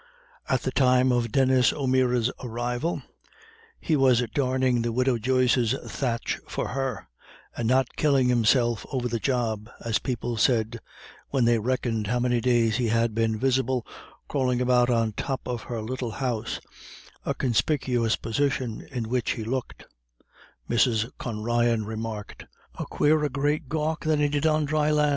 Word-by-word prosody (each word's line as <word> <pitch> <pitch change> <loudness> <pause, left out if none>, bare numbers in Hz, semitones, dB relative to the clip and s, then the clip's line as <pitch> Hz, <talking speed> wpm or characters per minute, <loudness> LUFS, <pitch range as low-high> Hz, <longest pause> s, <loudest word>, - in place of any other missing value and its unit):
At 130 -2 +1
the 130 - -1
time 130 -1 +4
of 120 -2 0
Denis 130 -2 +4
O'Meara's 130 -3 +1
arrival, 120 +6 -2 0.8
he 160 - 0
was 130 -3 +4
darning 130 -3 +1
the 115 0 -1
widow 125 0 +1
Joyce's 125 0 +2
thatch 120 -4 -2
for - - -3
her, 130 -5 -3 0.5
and 115 - -2
"not 130 +1 +2
killin' 140 -4 +3
himself 120 -1 +2
ever 125 -3 -1
the 115 -1 -2
job," 115 -4 -1 0.2
as 115 -2 +1
people 120 -2 -3
said, 115 0 +1 0.5
when 130 -4 +1
they 120 -1 +3
reckoned 115 -2 -1
how 125 +3 0
many 120 -1 +1
days 115 -2 +2
he 125 -2 0
had 115 0 +1
been 110 0 0
visible 130 0 +1 0.4
crawling 125 -3 0
about 125 -1 +3
on 115 -2 +2
the - - -2
top 135 -2 -4
of 125 -2 -3
her 115 -3 -3
little 120 0 -4
house, 120 -4 -2 0.6
a - - -2
conspicuous 125 -2 +1
position 125 -1 -1
in 120 -3 -4
which 125 0 0
he 115 - -5
looked, 125 +3 -4 0.8
Mrs. 115 -1 +2
Con 110 -3 -4
Ryan 120 -1 +1
remarked, 110 -1 -6 0.3
"a - - -5
quarer 150 0 +2
great 145 +1 -1
gawk 155 +1 -1
than 155 -1 +1
he 145 0 +2
did 145 +2 +1
on 155 -1 +2
dry 150 +1 +1
lan'." 150 -1 +3
125 Hz, 155 wpm, -26 LUFS, 115-130 Hz, 0.8 s, time